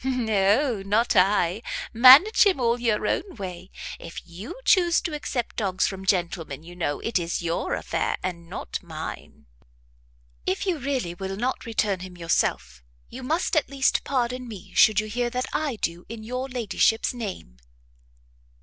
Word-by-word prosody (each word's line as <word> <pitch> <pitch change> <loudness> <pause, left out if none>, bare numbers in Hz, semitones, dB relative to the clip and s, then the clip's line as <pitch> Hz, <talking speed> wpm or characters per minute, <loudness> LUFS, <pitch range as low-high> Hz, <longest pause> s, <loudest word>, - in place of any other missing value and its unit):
"No, 225 -1 +1
not 215 +4 +1
I! 190 0 +3 0.3
manage 265 - +8
him 375 -7 +1
all 235 0 +1
your 225 -3 0
own 385 - -1
way; 185 -3 -7 0.3
if 170 - -8
you 190 - -9
chuse 350 -4 +4
to 330 - -4
accept 275 -4 -3
dogs 190 -4 +1
from 190 -1 -5
gentlemen, 170 -6 -1
you 175 +1 -12
know, 155 -5 -2
it 230 -4 0
is 170 0 -3
your 165 0 -1
affair, - - -2
and 170 -2 -5
not - - -5
mine." - - -8 1.0
"If 190 - 0
you 360 -5 0
really 260 -10 -2
will 190 +2 -5
not 245 +2 -2
return 210 -4 0
him 180 0 -9
yourself, 165 - -1 0.3
you 260 - -9
must 320 +8 -1
at 310 - +2
least 275 -1 +1
pardon 250 -1 -1
me 210 -5 -10
should 215 -2 +5
you 215 - -1
hear 240 +3 -1
that 250 +1 -2
I 295 -5 -1
do 170 -4 -4
in 225 -1 -7
your 250 +4 -4
ladyship's 230 -2 +1
name." 195 - -7
220 Hz, 160 wpm, -25 LUFS, 185-255 Hz, 1.0 s, manage